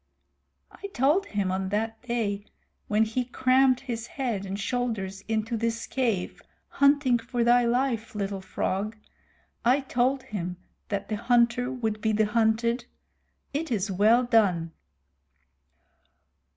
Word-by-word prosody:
"I 400 - -8
told 300 +10 +3
him 200 -3 -1
on 190 0 -2
that 220 +2 -2
day, 220 -5 -2 0.4
when 215 +1 +3
he 225 +3 -1
crammed 255 +1 +3
his 235 -3 -5
head 230 -8 -3
and 195 +1 -4
shoulders 205 -4 -2
into 225 +1 -1
this 230 0 -2
cave, 230 -9 -1 0.3
hunting 280 -3 +3
for 240 +1 -2
thy 240 +1 +5
life, 240 -2 0
Little 200 -1 -3
Frog 200 +3 -2 0.7
I 255 +4 +4
told 260 0 0
him 180 -3 -5 0.3
that 200 -1 -3
the 215 - -1
hunter 240 +2 +2
would 220 -4 -3
be 220 0 +1
the 215 +1 +3
hunted. 230 +2 +1 0.7
It 305 +1 -2
is 205 -3 0
well 215 +6 +4
done." 195 -9 +2
230 Hz, 130 wpm, -27 LUFS, 205-250 Hz, 0.7 s, thy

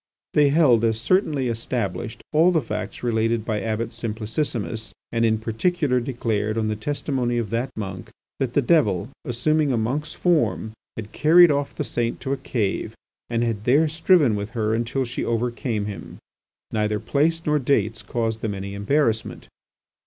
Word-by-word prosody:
They 145 -1 +5
held 140 -7 +4
as 110 -1 +2
certainly 150 - +1
established 115 -1 -3
all 165 +4 +5
the 165 - +3
facts 110 -4 -5
related 115 -1 +1
by 110 -3 -1
Abbot 110 +2 -2
Simplicissimus, 115 -1 -3 0.2
and 115 0 +1
in 110 -1 +3
particular 125 +5 0
declared, 115 -4 -2
on 110 -1 0
the 110 - -1
testimony 125 0 -1
of 115 -3 -2
that 120 +3 -1
monk, 95 -3 -5 0.3
that 130 -3 -1
the 145 - +2
devil, 120 - +2
assuming 145 +4 +1
a 125 - +1
monk's 140 +8 -2
form 160 -10 +1 0.3
had 110 -1 -6
carried 170 +2 +6
off 145 -1 -1
the - - -2
saint 120 -1 -2
to 135 - -1
a - - -2
cave 115 -6 -2 0.3
and 115 0 0
had 115 -3 -2
there 145 +6 +4
striven 160 - +3
with 100 +1 -4
her 110 0 +1
until 120 +4 -1
she 120 - -4
overcame 115 -1 -1
him. 100 -5 -7 0.5
Neither 105 -1 0
places 165 +6 0
nor 150 0 +2
dates 115 -5 +1
caused 115 -2 -2
them 105 -2 -2
any 100 0 -6
embarrassment. 110 +2 0
115 Hz, 165 wpm, -23 LUFS, 110-140 Hz, 0.5 s, carried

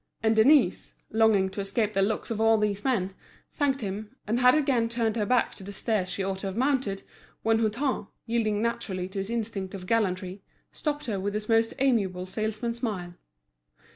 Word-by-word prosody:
And 220 0 +3
Denise, 220 -3 +4 0.2
longing 215 -3 +4
to 200 - -4
escape 210 +2 -1
the 195 - +2
looks 220 +4 0
of 220 -1 -1
all 225 0 +5
these 205 -1 0
men, 195 -8 0 0.4
thanked 275 -2 0
him, 210 +3 -5
and 230 +3 0
had 250 +2 +6
again 265 -6 +2
turned 230 -2 0
her 210 -3 0
back 250 -1 +2
to 195 - -12
the 200 - -7
stairs 200 -2 -1
she 195 - -2
ought 190 0 -2
to 195 - -4
have 195 +2 -5
mounted, 255 -7 0 0.4
when 225 0 +3
Hutin, 230 +1 0 0.2
yielding 220 -2 0
naturally 200 -6 -2
to 195 +1 -4
his 195 +2 -3
instinct 210 -4 -3
of 185 -2 -7
gallantry, 190 -2 0 0.3
stopped 295 -1 -3
her 210 -6 -2
with 200 +2 -2
his 210 0 -3
most 225 0 +2
amiable 205 -9 +1
salesman's 220 +4 -3
smile. 185 -7 -3
215 Hz, 190 wpm, -27 LUFS, 195-235 Hz, 0.4 s, had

